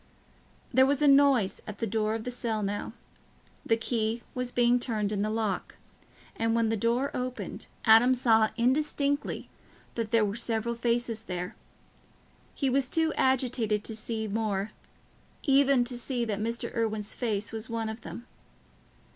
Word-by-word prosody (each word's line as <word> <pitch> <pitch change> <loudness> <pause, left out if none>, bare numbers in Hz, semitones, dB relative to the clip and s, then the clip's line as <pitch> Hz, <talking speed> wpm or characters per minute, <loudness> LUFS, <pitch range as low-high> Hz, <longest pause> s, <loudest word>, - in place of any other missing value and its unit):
There 260 +1 +6
was 285 +1 +1
a - - +5
noise 275 -7 +4
at 210 -1 -6
the 230 - -2
door 215 0 0
of 225 - -4
the 250 - -3
cell 230 -3 -2
now—the 205 +2 -5
key 225 0 -1
was 250 -1 -3
being 245 0 +3
turned 215 -4 -1
in 205 -2 -1
the 210 - 0
lock, 215 -4 -2 0.6
and 225 0 0
when 230 -1 +2
the 225 - +1
door 235 +6 0
opened, 250 0 -5 0.2
Adam 240 +3 +7
saw 225 -3 +4
indistinctly 285 +3 0 0.5
that 230 -2 -3
there 225 -1 +3
were 200 0 -3
several 230 0 -1
faces 235 -1 0
there. 180 -3 -5 1.0
He 275 - 0
was 260 0 +2
too 320 -1 +2
agitated 245 -5 +1
to 220 - -3
see 220 0 -3
more—even 225 +6 -1
to 245 0 -5
see 245 -1 -1
that 210 -3 -2
Mr. 230 +2 -2
Irwine's 220 -2 -1
face 210 -4 -2
was 220 -1 -4
one 230 -1 -2
of 220 +1 -6
them. 240 - -8
230 Hz, 155 wpm, -28 LUFS, 220-250 Hz, 1.0 s, Adam